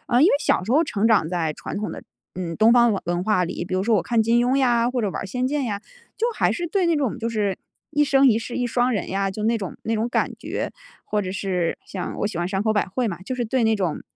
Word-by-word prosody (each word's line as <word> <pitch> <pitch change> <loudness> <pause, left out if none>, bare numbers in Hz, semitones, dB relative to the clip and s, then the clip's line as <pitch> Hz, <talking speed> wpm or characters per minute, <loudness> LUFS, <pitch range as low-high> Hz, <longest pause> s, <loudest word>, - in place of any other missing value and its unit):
啊 245 -1 +3
因 305 - +7
为 - - +4
小 - - +2
时 220 - -5
候 310 +5 +4
成 220 -7 0
长 205 -8 +3
在 170 -3 -1
传 - - -6
统 210 - -3
的 - - -8 0.3
嗯， 170 -2 -4
东 220 +2 +5
方 240 -1 +5
文 195 - -2
文 175 +1 -1
化 200 -4 +2
里， 175 0 -4
比 185 - -4
如 185 - +1
说 220 +2 +3
我 185 - +1
看 230 -2 +2
"金 235 +2 +3
庸" 255 - +2
呀， 240 -3 +3
或 250 -1 -1
者 205 - 0
玩 - - -4
儿 - - -5
"仙 250 +6 -1
剑" 290 0 -1
呀， 205 -4 -3 0.4
就 460 - +1
还 - - +2
是 345 - -3
对 370 +1 +1
那 340 - +3
种 275 -6 -1
就 230 - -2
是， 205 -4 -1 0.3
“一 295 0 +3
生 275 -1 +4
一 225 - +4
世 230 +1 -6
一 245 - 0
双 245 +1 +1
人” 210 - -2
呀， 195 +1 0
就 210 +3 -5
那 230 +1 +2
种 190 -4 -6
那 225 - -1
种 225 +2 0
感 - - 0
觉。 - - -4 0.4
或 210 -1 0
者 185 -1 -4
是 185 -3 -1
像 185 -2 -5
我 - - 0
喜 205 - -5
欢 175 - 0
山 190 0 -1
口 220 0 +2
百 210 - +2
惠 225 +5 -1
嘛， 170 - -4
就 255 - -4
是 245 -1 -2
对 235 +1 +1
那 220 0 +3
种， 180 -6 -2
220 Hz, 315 characters per minute, -23 LUFS, 190-245 Hz, 0.4 s, 因